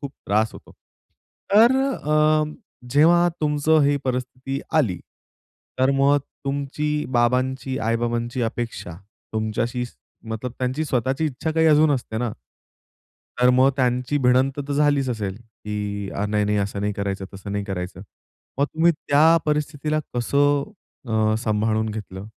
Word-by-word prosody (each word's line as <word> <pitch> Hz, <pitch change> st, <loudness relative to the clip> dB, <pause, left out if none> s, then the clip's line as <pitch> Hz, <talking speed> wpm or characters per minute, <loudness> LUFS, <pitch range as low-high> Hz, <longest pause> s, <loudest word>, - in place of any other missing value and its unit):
खूप 140 Hz, -2 st, -5 dB, 0.2 s
त्रास 110 Hz, +2 st, +1 dB
होतो. -, -, -14 dB, 0.8 s
तर 235 Hz, +5 st, +6 dB, 0.2 s
अ, 155 Hz, 0 st, +2 dB, 0.5 s
जेव्हा 170 Hz, +5 st, +5 dB
तुमचं 150 Hz, +1 st, +3 dB
ही 145 Hz, 0 st, +3 dB
परिस्थिती 130 Hz, +1 st, -3 dB
आली 115 Hz, -, +2 dB, 0.8 s
तर 130 Hz, +1 st, +3 dB
मग 140 Hz, +1 st, +4 dB, 0.3 s
तुमची, 150 Hz, +2 st, -2 dB
बाबांची, 130 Hz, +2 st, 0 dB
आई-बाबांची 120 Hz, +2 st, -1 dB
अपेक्षा 115 Hz, -7 st, -4 dB, 0.4 s
तुमच्याशी 115 Hz, +3 st, -1 dB, 0.4 s
मतलब 115 Hz, +2 st, -4 dB
त्यांची 130 Hz, +5 st, -1 dB
स्वताःची 130 Hz, +3 st, 0 dB
इच्छा 150 Hz, +3 st, -3 dB
काही 160 Hz, 0 st, +2 dB
अजून 155 Hz, 0 st, +5 dB
असते 120 Hz, -5 st, -2 dB
ना. 120 Hz, -2 st, -1 dB, 1.1 s
तर 125 Hz, -, +6 dB
मग 130 Hz, +2 st, +5 dB
त्यांची 125 Hz, +2 st, +1 dB
भिडंत 130 Hz, +2 st, +2 dB
तर -, -, -1 dB
झालीच 145 Hz, -2 st, +2 dB
असेल, 105 Hz, -4 st, -3 dB
की 105 Hz, -3 st, -6 dB, 0.2 s
"नाही, 105 Hz, 0 st, +1 dB
नाही, 105 Hz, 0 st, +1 dB
असं 100 Hz, 0 st, -2 dB
नाही 105 Hz, 0 st, -1 dB
करायचं, 100 Hz, -1 st, -3 dB
तसं 100 Hz, +1 st, -7 dB
नाही 100 Hz, 0 st, -2 dB
करायचं." 90 Hz, -1 st, -5 dB, 0.6 s
मग 140 Hz, -, +4 dB
तुम्ही 165 Hz, +2 st, +2 dB
त्या 160 Hz, +1 st, +4 dB
परिस्थितीला 150 Hz, 0 st, -1 dB
कसं 140 Hz, +3 st, +2 dB, 0.4 s
अ, 110 Hz, -1 st, +2 dB
सांभाळून 110 Hz, -1 st, 0 dB
घेतलं? 100 Hz, -2 st, -7 dB
125 Hz, 130 wpm, -23 LUFS, 110-145 Hz, 1.1 s, तर